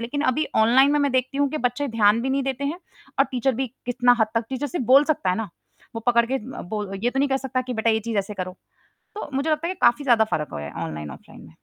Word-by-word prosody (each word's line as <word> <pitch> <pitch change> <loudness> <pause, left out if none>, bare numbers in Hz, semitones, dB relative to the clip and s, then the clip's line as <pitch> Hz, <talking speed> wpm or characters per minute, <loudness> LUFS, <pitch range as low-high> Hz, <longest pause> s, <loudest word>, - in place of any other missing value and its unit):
लेकिन 285 +5 -3
अभी 310 +4 -1
ऑनलाइन 250 +6 +5
में 295 - +3
मैं 280 -2 +1
देखती 260 +2 0
हूँ 285 -1 +3
कि 310 - -3
बच्चे 280 +4 -4
ध्यान 225 -1 +3
भी 265 - -1
नहीं 275 0 +1
देते 270 +1 -3
हैं 315 +5 -2 0.4
और 275 - +6
टीचर 255 +1 +1
भी 265 +3 -1 0.2
कितना 245 0 +3
हद 220 - +4
तक 230 0 +1
टीचर 270 +2 -3
सिर्फ़ 290 -5 -3
बोल 270 +4 +7
सकता 190 -10 -2
है 180 - 0
ना? 225 -3 -3 0.5
वो 225 - -4
पकड़ 235 -1 +4
के 265 - -2
अ, 260 +1 -5
बोल 205 +1 -5
ये 245 - +3
तो 270 - -3
नहीं 280 +1 +2
कह 270 - +1
सकता 265 -1 -2
कि 250 - -2
बेटा 220 +1 +1
ये 220 0 +1
चीज़ 225 -1 -2
ऐसे 200 +1 -3
करो, 185 -1 -5 0.6
तो 420 - -6
मुझे 275 +4 0
लगता 310 +2 0
है - - -1
ये - - -5
काफ़ी 240 +5 +4
ज़्यादा 235 -3 +5
फ़र्क 150 -1 -1
हो - - -4
गया 75 0 -6
ऑनलाइन, 75 -2 -6
ऑफ़लाइन 65 - -13
में। - - -16
245 Hz, 285 wpm, -23 LUFS, 220-275 Hz, 0.6 s, बोल